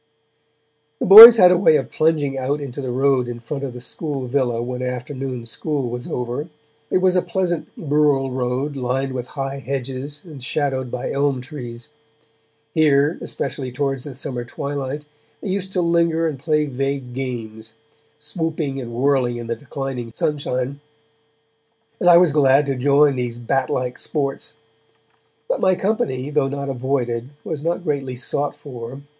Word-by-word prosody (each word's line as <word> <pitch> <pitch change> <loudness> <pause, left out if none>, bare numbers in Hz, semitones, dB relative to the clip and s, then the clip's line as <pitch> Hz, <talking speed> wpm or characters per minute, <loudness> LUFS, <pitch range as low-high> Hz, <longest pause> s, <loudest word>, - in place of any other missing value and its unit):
The - - -1
boys 225 +4 +13
had 180 -4 +7
a 180 - +4
way 160 -5 +5
of 135 -3 -1
plunging 155 -3 +1
out 135 +3 -1
into 140 -1 -6
the 130 - -4
road 130 0 +2
in 120 -1 -6
front 140 +4 -6
of 135 -3 -4
the 125 - -9
school 140 0 -5
villa 125 -3 0
when 125 +1 -4
afternoon 125 0 -4
school 135 +1 -3
was 125 0 -6
over; 125 +6 -4 0.4
it - - +2
was 185 0 +2
a 180 - +4
pleasant 175 -1 -2
rural 145 -3 +1
road 130 +3 -2
lined 135 +1 -2
with 125 -1 -4
high 135 0 -3
hedges 135 +2 -5
and 150 -7 -11
shadowed 135 -2 -1
by 120 - -4
elm 140 -1 0
trees. 125 -1 -9 0.8
Here, 150 -1 +3
especially 135 -1 -4
towards 135 0 -2
the 140 -3 -8
summer 125 -2 -5
twilight, 140 +3 -5 0.4
they 205 - -6
used 190 0 -2
to 180 - +1
linger 170 -1 +2
and 145 -4 -4
play 150 +1 +1
vague 135 -2 -3
games, 115 -4 -6 0.4
swooping 150 -2 -3
and 120 -2 -7
whirling 125 -1 +1
in 120 - -6
the 115 0 -2
declining 135 -4 -6
sunshine, 140 -2 -2 1.2
and 175 - +4
I 170 - +9
was 175 -2 +5
glad 140 -1 +4
to 135 -1 -1
join 140 +2 +4
these 120 -1 -3
bat 130 +2 -1
like 125 -1 -2
sports. 140 -3 -3 0.9
But - - -1
my 185 - +4
company, 190 - -1
though 150 -2 +2
not 140 0 -4
avoided, 125 -2 -2
was 150 -3 -5
not 170 +2 -1
greatly 140 -5 -2
sought 140 +3 -3
for. 130 -1 -9
135 Hz, 160 wpm, -21 LUFS, 125-150 Hz, 1.2 s, boys